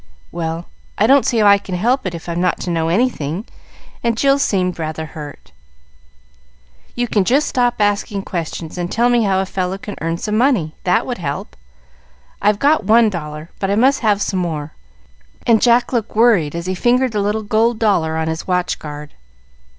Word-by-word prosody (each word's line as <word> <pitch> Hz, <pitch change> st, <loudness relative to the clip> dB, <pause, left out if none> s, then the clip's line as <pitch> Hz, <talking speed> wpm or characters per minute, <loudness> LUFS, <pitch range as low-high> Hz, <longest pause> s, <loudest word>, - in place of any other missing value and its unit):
"Well, 165 Hz, 0 st, -4 dB, 0.3 s
I 210 Hz, -, +3 dB
don't 270 Hz, +1 st, +4 dB
see 240 Hz, -, +1 dB
how 215 Hz, -, +3 dB
I 200 Hz, 0 st, +6 dB
can 190 Hz, -2 st, -6 dB
help 240 Hz, +5 st, +1 dB
if 170 Hz, 0 st, -9 dB
I'm 170 Hz, 0 st, -2 dB
not 180 Hz, -1 st, +1 dB
to 175 Hz, -, -3 dB
know 165 Hz, -1 st, 0 dB
anything;" 185 Hz, -, -1 dB, 0.6 s
and 230 Hz, -1 st, 0 dB
Jill 275 Hz, +2 st, +3 dB
seemed 185 Hz, -9 st, 0 dB
rather 160 Hz, 0 st, -4 dB
hurt. 150 Hz, -1 st, -10 dB, 1.4 s
"You 245 Hz, 0 st, -1 dB
can 205 Hz, -3 st, +2 dB
just 270 Hz, +9 st, +2 dB
stop 245 Hz, -1 st, +1 dB
asking 205 Hz, -1 st, 0 dB
questions, 165 Hz, -1 st, -5 dB
and 175 Hz, 0 st, -3 dB
tell 240 Hz, +2 st, +2 dB
me 240 Hz, -2 st, +3 dB
how 190 Hz, -1 st, +2 dB
a -, -, -2 dB
fellow 185 Hz, 0 st, -3 dB
can 205 Hz, +1 st, -8 dB
earn 165 Hz, +1 st, -1 dB
some 210 Hz, +4 st, -3 dB
money. 220 Hz, -, +2 dB
That 180 Hz, -, +2 dB
would 245 Hz, -5 st, -4 dB
help. 145 Hz, -4 st, -5 dB, 0.9 s
I've 205 Hz, 0 st, +3 dB
got 285 Hz, +2 st, +2 dB
one 220 Hz, +2 st, +4 dB
dollar, 150 Hz, -2 st, -7 dB
but 195 Hz, -, -1 dB
I 200 Hz, -, +2 dB
must 265 Hz, +5 st, +3 dB
have 210 Hz, -3 st, +1 dB
some 190 Hz, -, -1 dB
more;" 155 Hz, -4 st, -3 dB, 0.7 s
and 225 Hz, -2 st, +4 dB
Jack 240 Hz, +1 st, +3 dB
looked 230 Hz, -3 st, -2 dB
worried 210 Hz, -10 st, +3 dB
as 170 Hz, 0 st, -4 dB
he 185 Hz, -, -1 dB
fingered 245 Hz, +6 st, +2 dB
the 210 Hz, -2 st, -1 dB
little 210 Hz, +2 st, -1 dB
gold 220 Hz, +2 st, +1 dB
dollar 170 Hz, -8 st, +1 dB
on 160 Hz, 0 st, -1 dB
his 160 Hz, 0 st, -4 dB
watch 180 Hz, -1 st, 0 dB
guard. 150 Hz, -1 st, -8 dB
200 Hz, 190 wpm, -18 LUFS, 170-235 Hz, 1.4 s, I